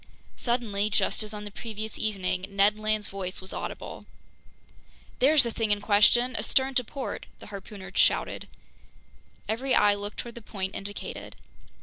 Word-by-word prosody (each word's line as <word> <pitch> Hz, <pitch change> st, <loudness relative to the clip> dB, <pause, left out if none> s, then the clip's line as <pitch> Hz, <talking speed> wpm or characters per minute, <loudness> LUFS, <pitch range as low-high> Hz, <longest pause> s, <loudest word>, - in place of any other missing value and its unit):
Suddenly, 220 Hz, -4 st, 0 dB
just -, -, +2 dB
as 215 Hz, -1 st, -2 dB
on 210 Hz, -1 st, -6 dB
the 205 Hz, -, -7 dB
previous 220 Hz, 0 st, -6 dB
evening, 190 Hz, -3 st, -1 dB
Ned 200 Hz, +2 st, +3 dB
Land's 215 Hz, -1 st, +1 dB
voice 190 Hz, -2 st, -4 dB
was 185 Hz, +1 st, +2 dB
audible. -, -, -6 dB, 1.1 s
"There's 290 Hz, +3 st, +6 dB
the 235 Hz, -, -1 dB
thing 225 Hz, -1 st, -1 dB
in 205 Hz, 0 st, +3 dB
question, 220 Hz, +4 st, +4 dB
astern 265 Hz, +3 st, +2 dB
to 250 Hz, -, +3 dB
port!" 270 Hz, +3 st, -5 dB
the -, -, -12 dB
harpooner 195 Hz, 0 st, -8 dB
shouted. -, -, +2 dB, 1.0 s
Every 250 Hz, +4 st, +1 dB
eye 205 Hz, 0 st, +6 dB
looked 205 Hz, 0 st, -5 dB
toward 235 Hz, -1 st, -5 dB
the 235 Hz, -, -9 dB
point 195 Hz, -3 st, -4 dB
indicated. 205 Hz, +1 st, -6 dB
210 Hz, 150 wpm, -28 LUFS, 200-235 Hz, 1.1 s, There's